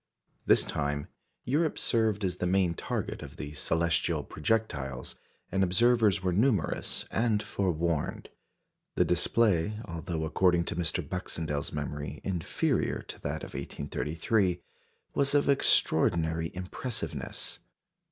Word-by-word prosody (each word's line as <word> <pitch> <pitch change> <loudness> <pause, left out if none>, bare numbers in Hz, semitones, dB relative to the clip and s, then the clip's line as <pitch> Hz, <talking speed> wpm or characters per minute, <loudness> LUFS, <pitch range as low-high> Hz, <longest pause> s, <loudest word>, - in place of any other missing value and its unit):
This - - +5
time, 70 0 -2 0.4
Europe 155 +5 +1
served 110 -4 +1
as 90 -1 -1
the 90 - -1
main 90 -2 +3
target - - -3
of - - -9
the 75 -1 -6
celestial 80 +1 +1
projectiles, 75 - -2 0.4
and 95 +1 +2
observers 105 +1 +3
were 90 -1 +1
numerous 105 -2 +1
and 110 -2 +1
forewarned. 85 -5 -1 0.7
The - - +4
display, 105 -4 +3
although, 85 -1 -3
according 85 +1 +3
to 85 - -3
Mr. 85 -3 -1
Baxendell's 80 -5 -3
memory, 75 -1 -4
inferior 90 -4 0
to - - -9
that - - -3
of - - -8
1833, 90 +6 -1 0.5
was 140 +1 +1
of 145 - +4
extraordinary 80 - +3
impressiveness. 95 +7 -4
90 Hz, 115 wpm, -30 LUFS, 80-105 Hz, 0.7 s, This